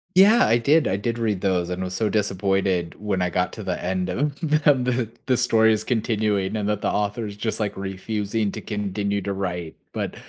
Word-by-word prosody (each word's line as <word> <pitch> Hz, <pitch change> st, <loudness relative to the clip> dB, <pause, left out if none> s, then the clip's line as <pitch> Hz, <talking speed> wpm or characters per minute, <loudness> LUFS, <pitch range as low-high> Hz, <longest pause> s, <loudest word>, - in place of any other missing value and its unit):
Yeah, 215 Hz, +6 st, +7 dB
I 115 Hz, -, +4 dB
did, 145 Hz, +6 st, +3 dB
I 95 Hz, -, +1 dB
did 115 Hz, +4 st, -2 dB
read 105 Hz, -5 st, -1 dB
those, 90 Hz, -3 st, +1 dB
and 90 Hz, +1 st, -3 dB
was 90 Hz, 0 st, -4 dB
so 110 Hz, +2 st, +1 dB
disappointed 95 Hz, -3 st, 0 dB
when 100 Hz, -3 st, -1 dB
I 90 Hz, -, 0 dB
got 90 Hz, +2 st, 0 dB
to 110 Hz, -, -7 dB
the 95 Hz, -2 st, -3 dB
end 90 Hz, 0 st, -1 dB
of 140 Hz, +10 st, -1 dB
the 155 Hz, -2 st, +2 dB
of 125 Hz, -3 st, +1 dB, 0.2 s
the 130 Hz, -, +3 dB
story's 110 Hz, -3 st, +3 dB
continuing 105 Hz, -4 st, 0 dB
and 105 Hz, -1 st, -1 dB
that 105 Hz, -1 st, 0 dB
the -, -, +1 dB
author 105 Hz, +2 st, -1 dB
is 100 Hz, -, -7 dB
just, 110 Hz, +1 st, -2 dB
like, 105 Hz, -2 st, -2 dB
refusing 100 Hz, +2 st, -2 dB
to -, -, -6 dB
continue 100 Hz, -1 st, -2 dB
to 100 Hz, +1 st, -2 dB
write, 90 Hz, -4 st, -4 dB, 0.2 s
but -, -, -3 dB
105 Hz, 210 wpm, -23 LUFS, 95-115 Hz, 0.2 s, Yeah